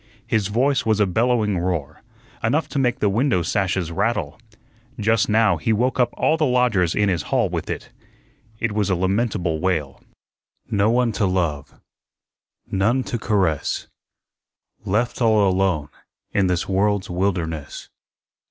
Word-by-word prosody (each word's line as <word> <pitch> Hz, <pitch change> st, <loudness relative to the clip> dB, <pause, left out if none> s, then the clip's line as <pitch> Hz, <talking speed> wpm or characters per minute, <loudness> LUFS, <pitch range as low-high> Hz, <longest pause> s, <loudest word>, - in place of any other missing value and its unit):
His 110 Hz, -4 st, 0 dB
voice 130 Hz, +6 st, +1 dB
was 110 Hz, -1 st, +1 dB
a 105 Hz, -, +4 dB
bellowing 110 Hz, 0 st, +1 dB
roar, 85 Hz, -5 st, -3 dB, 0.4 s
enough 145 Hz, +9 st, +1 dB
to 140 Hz, -, -2 dB
make 125 Hz, -3 st, +1 dB
the 105 Hz, -, +3 dB
window 110 Hz, -2 st, +1 dB
sashes 95 Hz, -1 st, -1 dB
rattle. 100 Hz, -4 st, -1 dB, 0.6 s
Just 110 Hz, +1 st, +2 dB
now 105 Hz, -4 st, +3 dB
he 80 Hz, +9 st, -1 dB
woke 125 Hz, +4 st, +1 dB
up 125 Hz, -2 st, +4 dB
all 160 Hz, -, +2 dB
the 160 Hz, -, 0 dB
lodgers 120 Hz, -9 st, +2 dB
in 105 Hz, -, +2 dB
his 90 Hz, -4 st, 0 dB
hall -, -, 0 dB
with -, -, -4 dB
it. -, -, -5 dB, 0.7 s
It 115 Hz, -, -1 dB
was 105 Hz, -1 st, 0 dB
a 95 Hz, -, +2 dB
lamentable 95 Hz, -3 st, 0 dB
wail: 80 Hz, -7 st, -2 dB, 0.7 s
"No 100 Hz, +1 st, +2 dB
one 120 Hz, 0 st, +2 dB
to 105 Hz, -2 st, 0 dB
love, 85 Hz, -6 st, -2 dB, 0.9 s
none 110 Hz, +7 st, +1 dB
to 120 Hz, -, -4 dB
caress, 95 Hz, -9 st, 0 dB, 1.0 s
Left 120 Hz, +6 st, -1 dB
all 110 Hz, -3 st, +4 dB
alone 90 Hz, -6 st, 0 dB, 0.4 s
in 95 Hz, -2 st, +2 dB
this 90 Hz, -1 st, -1 dB
world's 100 Hz, 0 st, 0 dB
wilderness." 85 Hz, -5 st, -3 dB
100 Hz, 145 wpm, -22 LUFS, 90-115 Hz, 1.0 s, a